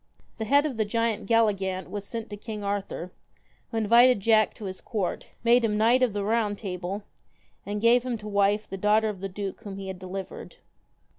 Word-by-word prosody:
The 220 Hz, -, -2 dB
head 285 Hz, +6 st, +4 dB
of 270 Hz, -6 st, -3 dB
the 220 Hz, -, +2 dB
giant 225 Hz, -1 st, -1 dB
Galligant 195 Hz, -5 st, +1 dB
was 205 Hz, -1 st, -6 dB
sent 225 Hz, +1 st, -6 dB
to -, -, -4 dB
King 210 Hz, 0 st, -7 dB
Arthur, 200 Hz, -3 st, -3 dB, 0.6 s
who 230 Hz, -, -4 dB
invited 235 Hz, +2 st, +5 dB
Jack 215 Hz, +1 st, +3 dB
to 215 Hz, -, -8 dB
his 185 Hz, -1 st, -6 dB
court, 200 Hz, -6 st, -3 dB, 0.2 s
made 240 Hz, +1 st, +5 dB
him 210 Hz, -2 st, +1 dB
knight 235 Hz, +4 st, +4 dB
of 250 Hz, -5 st, +2 dB
the 205 Hz, -1 st, -2 dB
Round 210 Hz, -1 st, 0 dB
Table, 190 Hz, 0 st, -4 dB, 0.6 s
and 205 Hz, +1 st, -2 dB
gave 235 Hz, +3 st, +5 dB
him 245 Hz, -1 st, -3 dB
to 210 Hz, 0 st, -9 dB
wife 205 Hz, +1 st, +2 dB
the 195 Hz, -, -6 dB
daughter 215 Hz, +2 st, +3 dB
of 205 Hz, -3 st, -6 dB
the 195 Hz, +1 st, -4 dB
duke 195 Hz, +1 st, -5 dB
whom 200 Hz, -3 st, -7 dB
he 195 Hz, -1 st, -6 dB
had 185 Hz, -1 st, -6 dB
delivered. 185 Hz, +1 st, -7 dB
210 Hz, 205 wpm, -27 LUFS, 195-230 Hz, 0.6 s, invited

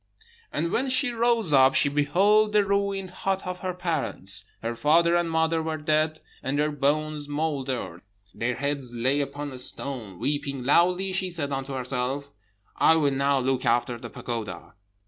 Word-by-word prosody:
"And 170 Hz, -, -2 dB
when 265 Hz, +3 st, 0 dB
she 255 Hz, 0 st, +3 dB
rose 230 Hz, -7 st, +3 dB
up 135 Hz, -1 st, +6 dB
she -, -, +6 dB
beheld 195 Hz, +10 st, +3 dB
the 210 Hz, -1 st, +4 dB
ruined 200 Hz, -1 st, -1 dB
hut 195 Hz, +1 st, -2 dB
of 180 Hz, 0 st, -5 dB
her 185 Hz, -1 st, -4 dB
parents. 160 Hz, -, -1 dB, 0.2 s
Her 115 Hz, +1 st, -2 dB
father 170 Hz, +6 st, +3 dB
and 175 Hz, -1 st, +1 dB
mother 160 Hz, 0 st, +1 dB
were 160 Hz, 0 st, -3 dB
dead, 155 Hz, +1 st, 0 dB, 0.2 s
and 135 Hz, +2 st, -2 dB
their 150 Hz, +1 st, +1 dB
bones 150 Hz, +1 st, -1 dB
mouldered; 135 Hz, -, -3 dB, 0.3 s
their 120 Hz, +2 st, -2 dB
heads 140 Hz, -2 st, -3 dB
lay 130 Hz, +5 st, +1 dB
upon 145 Hz, +1 st, -5 dB
a 130 Hz, -, -7 dB
stone. 125 Hz, -6 st, -3 dB
Weeping 140 Hz, +1 st, -2 dB
loudly, 180 Hz, +7 st, +3 dB
she 185 Hz, 0 st, -1 dB
said 155 Hz, -5 st, -3 dB
unto 135 Hz, 0 st, -3 dB
herself, 130 Hz, +2 st, -3 dB, 0.5 s
'I 160 Hz, -, +5 dB
will 145 Hz, -3 st, +2 dB
now 140 Hz, +1 st, +1 dB
look 130 Hz, 0 st, 0 dB
after 120 Hz, 0 st, +1 dB
the -, -, -8 dB
pagoda.' 110 Hz, -7 st, -6 dB
145 Hz, 165 wpm, -26 LUFS, 135-175 Hz, 0.5 s, up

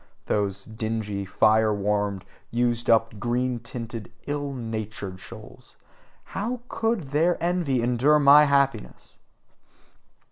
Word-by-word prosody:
Those 100 Hz, -1 st, -1 dB
dingy, 110 Hz, -3 st, -4 dB
fire 110 Hz, +3 st, +3 dB
warmed, 100 Hz, -1 st, -1 dB, 0.2 s
used 120 Hz, 0 st, 0 dB
up, 115 Hz, -2 st, +3 dB
green 120 Hz, +2 st, -1 dB
tinted, 115 Hz, -2 st, -7 dB
ill 145 Hz, -1 st, -3 dB
natured 110 Hz, -6 st, -5 dB
souls -, -, -13 dB, 0.5 s
how 235 Hz, +5 st, -4 dB
COULD 225 Hz, -2 st, 0 dB
their 165 Hz, +4 st, +2 dB
envy 170 Hz, -8 st, 0 dB
endure 125 Hz, +5 st, +3 dB
my 145 Hz, +1 st, +7 dB
happiness! 140 Hz, -5 st, -1 dB
120 Hz, 105 wpm, -25 LUFS, 110-140 Hz, 0.5 s, my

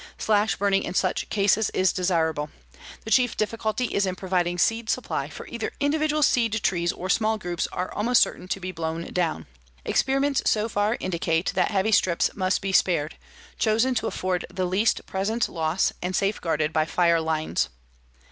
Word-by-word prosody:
Slash 215 Hz, 0 st, +2 dB
burning 195 Hz, -1 st, +1 dB
in -, -, -5 dB
such 185 Hz, -1 st, 0 dB
cases 205 Hz, +1 st, +2 dB
is 185 Hz, -2 st, +3 dB
desirable. 160 Hz, -5 st, 0 dB, 0.6 s
The 220 Hz, -, -6 dB
chief 245 Hz, -1 st, +3 dB
difficulty 220 Hz, +2 st, -1 dB
is 200 Hz, -1 st, +1 dB
in 185 Hz, -, -2 dB
providing 180 Hz, -2 st, -1 dB
seed 225 Hz, +4 st, +1 dB
supply, -, -, -2 dB
for -, -, -9 dB
either -, -, -5 dB
individual 305 Hz, +1 st, +1 dB
seed 230 Hz, -5 st, +2 dB
trees 175 Hz, -2 st, +1 dB
or 185 Hz, -, -6 dB
small 220 Hz, +3 st, +2 dB
groups 175 Hz, -4 st, -3 dB
are 180 Hz, -, -4 dB
almost 235 Hz, +4 st, +3 dB
certain -, -, -6 dB
to 195 Hz, -, -2 dB
be 185 Hz, 0 st, -5 dB
blown 165 Hz, -1 st, -4 dB
down. 165 Hz, -, -1 dB, 0.4 s
Experiments 275 Hz, +1 st, +1 dB
so 215 Hz, 0 st, +1 dB
far 210 Hz, +1 st, 0 dB
indicate 170 Hz, -1 st, -1 dB
that -, -, +1 dB
heavy 200 Hz, +2 st, +1 dB
strips 185 Hz, -4 st, +2 dB
must 185 Hz, -1 st, 0 dB
be 195 Hz, -, -1 dB
spared, 170 Hz, -5 st, +2 dB, 0.4 s
chosen 225 Hz, +4 st, +2 dB
to 225 Hz, -2 st, -1 dB
afford 185 Hz, -3 st, -2 dB
the 185 Hz, 0 st, -2 dB
least 195 Hz, +5 st, +1 dB
present 215 Hz, +5 st, -1 dB
loss 160 Hz, +2 st, 0 dB
and 180 Hz, +1 st, -2 dB
safeguarded 165 Hz, -6 st, 0 dB
by 155 Hz, -1 st, +2 dB
fire 170 Hz, 0 st, +2 dB
lines. 155 Hz, -, -1 dB
190 Hz, 170 wpm, -25 LUFS, 175-220 Hz, 0.6 s, is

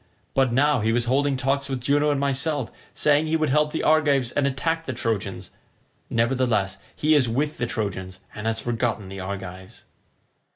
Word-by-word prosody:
But 135 Hz, -2 st, +3 dB
now 140 Hz, +2 st, +3 dB
he 110 Hz, +1 st, +1 dB
was 120 Hz, 0 st, +1 dB
holding 135 Hz, +2 st, +1 dB
talk 135 Hz, +2 st, 0 dB
with 135 Hz, -1 st, -2 dB
Juno 145 Hz, +3 st, +2 dB
and 145 Hz, -2 st, +1 dB
myself, 140 Hz, -1 st, -1 dB, 0.2 s
saying 150 Hz, +1 st, +3 dB
he 160 Hz, -, +1 dB
would 155 Hz, -3 st, 0 dB
help 150 Hz, +1 st, +3 dB
the -, -, -2 dB
Argives 145 Hz, -5 st, +3 dB
and 140 Hz, -1 st, +1 dB
attack 160 Hz, +5 st, -1 dB
the 130 Hz, -, -2 dB
Trojans; 100 Hz, -6 st, -3 dB, 0.6 s
nevertheless 115 Hz, -4 st, +1 dB, 0.2 s
he 155 Hz, +1 st, +2 dB
is 135 Hz, -6 st, +4 dB
with 145 Hz, +6 st, -1 dB
the 120 Hz, -, 0 dB
Trojans, 95 Hz, -5 st, -4 dB
and 105 Hz, +1 st, -5 dB
has 115 Hz, 0 st, 0 dB
forgotten 115 Hz, -3 st, -2 dB
the 95 Hz, 0 st, -7 dB
Argives." 95 Hz, +1 st, -7 dB
130 Hz, 175 wpm, -24 LUFS, 110-145 Hz, 0.6 s, is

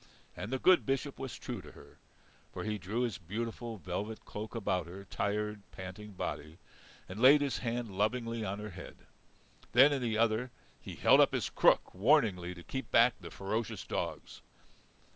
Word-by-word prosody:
And 110 Hz, -, -6 dB
the 130 Hz, -, +1 dB
good 185 Hz, +6 st, +5 dB
Bishop 135 Hz, +1 st, -2 dB
was 135 Hz, -3 st, -5 dB
true -, -, -6 dB
to -, -, -13 dB
her. -, -, -16 dB, 0.5 s
For -, -, -5 dB
he 105 Hz, -1 st, -2 dB
drew 100 Hz, +7 st, -2 dB
his 120 Hz, -5 st, -1 dB
beautiful 115 Hz, +5 st, -5 dB
velvet 100 Hz, +4 st, -5 dB
cloak 110 Hz, +3 st, -7 dB
about 95 Hz, -6 st, -1 dB
her 95 Hz, +3 st, -9 dB
tired, 105 Hz, +1 st, -2 dB
panting 95 Hz, +2 st, -8 dB
body, 80 Hz, -3 st, -5 dB, 0.5 s
and 100 Hz, +5 st, -7 dB
laid 140 Hz, +3 st, +8 dB
his 140 Hz, -2 st, -1 dB
hand 115 Hz, -4 st, -3 dB
lovingly 115 Hz, +2 st, 0 dB
on 100 Hz, 0 st, -3 dB
her 105 Hz, 0 st, -6 dB
head. -, -, -10 dB, 0.8 s
Then 135 Hz, +5 st, +7 dB
in 135 Hz, -, -1 dB
the 115 Hz, -3 st, 0 dB
other, 115 Hz, +2 st, +2 dB, 0.3 s
he -, -, -8 dB
held -, -, +6 dB
up -, -, +4 dB
his -, -, -2 dB
crook -, -, +3 dB
warningly 95 Hz, -, +2 dB
to 85 Hz, -, -11 dB
keep 130 Hz, +6 st, -5 dB
back 120 Hz, +1 st, +5 dB
the 85 Hz, -, -8 dB
ferocious 105 Hz, +5 st, -3 dB
dogs. -, -, -4 dB
110 Hz, 175 wpm, -32 LUFS, 100-120 Hz, 0.8 s, laid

